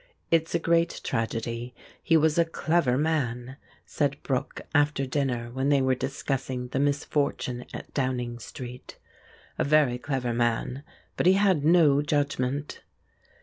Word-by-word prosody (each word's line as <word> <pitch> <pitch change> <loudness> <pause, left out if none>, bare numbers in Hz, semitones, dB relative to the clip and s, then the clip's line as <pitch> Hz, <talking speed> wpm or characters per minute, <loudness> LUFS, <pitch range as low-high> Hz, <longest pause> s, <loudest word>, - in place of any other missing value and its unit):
"It's 165 0 +2
a - - +5
great 170 0 +1
tragedy 115 +2 -3 0.3
he 165 - +4
was 160 +1 +3
a - - +6
clever 165 -5 +1
man," 130 -4 -1 0.3
said 140 -1 -1
Brooke 135 0 -2
after 145 -2 +2
dinner 130 -4 -2
when 135 +2 0
they 140 -1 +4
were 130 -1 +2
discussing 130 -1 -3
the 135 - -2
misfortune 140 -3 -1
at - - -9
Downing 125 -3 -2
Street; 125 +1 -9 0.6
"a - - +3
very 145 -4 +3
clever 125 -3 -2
man, 120 +2 0 0.4
but - - +2
he 185 - +7
had 190 -6 +3
no 155 -3 +5
judgment." 145 -1 -1
135 Hz, 140 wpm, -27 LUFS, 125-150 Hz, 0.6 s, he